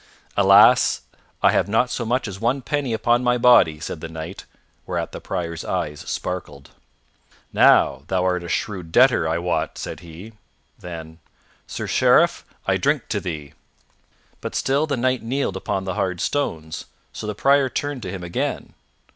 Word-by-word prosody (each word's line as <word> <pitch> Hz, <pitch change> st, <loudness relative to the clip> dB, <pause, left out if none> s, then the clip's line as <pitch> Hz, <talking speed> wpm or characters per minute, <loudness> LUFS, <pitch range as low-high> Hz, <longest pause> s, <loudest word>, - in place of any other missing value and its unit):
"Alas! -, -, +6 dB, 0.4 s
I -, -, +6 dB
have -, -, +1 dB
not 115 Hz, +4 st, +2 dB
so 120 Hz, -, -2 dB
much 125 Hz, +1 st, 0 dB
as 95 Hz, -2 st, -7 dB
one 125 Hz, +3 st, 0 dB
penny 145 Hz, -3 st, -2 dB
upon 120 Hz, +2 st, +2 dB
my 125 Hz, 0 st, +2 dB
body," 120 Hz, -11 st, +5 dB
said 80 Hz, 0 st, -6 dB
the 80 Hz, -, -6 dB
Knight; 80 Hz, +3 st, -8 dB, 0.4 s
whereat -, -, -3 dB
the -, -, -8 dB
Prior's 85 Hz, -2 st, -4 dB
eyes 80 Hz, -6 st, -3 dB
sparkled. 75 Hz, -7 st, -5 dB, 0.8 s
"Now, 65 Hz, -, +5 dB
thou 95 Hz, 0 st, 0 dB
art 90 Hz, -1 st, 0 dB
a 85 Hz, -, -7 dB
shrewd 90 Hz, -1 st, -3 dB
debtor, 125 Hz, -6 st, +4 dB
I 80 Hz, -, 0 dB
wot," 90 Hz, +1 st, -2 dB
said -, -, -6 dB
he. 90 Hz, +6 st, -11 dB, 0.5 s
Then, 80 Hz, -2 st, -9 dB, 0.5 s
"Sir -, -, -5 dB
Sheriff, -, -, +3 dB, 0.2 s
I -, -, +2 dB
drink -, -, 0 dB
to -, -, 0 dB
thee." 75 Hz, -5 st, -6 dB, 0.9 s
But -, -, -6 dB
still 140 Hz, +4 st, +1 dB
the 140 Hz, -3 st, -1 dB
Knight 130 Hz, +1 st, +1 dB
kneeled 120 Hz, -3 st, -2 dB
upon 95 Hz, 0 st, -2 dB
the 95 Hz, -1 st, -3 dB
hard 90 Hz, -1 st, -2 dB
stones, 80 Hz, -, -2 dB, 0.3 s
so 105 Hz, -, -6 dB
the 105 Hz, -, -3 dB
Prior 135 Hz, +3 st, +3 dB
turned 145 Hz, +1 st, -3 dB
to 95 Hz, -, -5 dB
him 95 Hz, -2 st, -6 dB
again. 85 Hz, 0 st, -3 dB
95 Hz, 165 wpm, -22 LUFS, 85-125 Hz, 0.9 s, Alas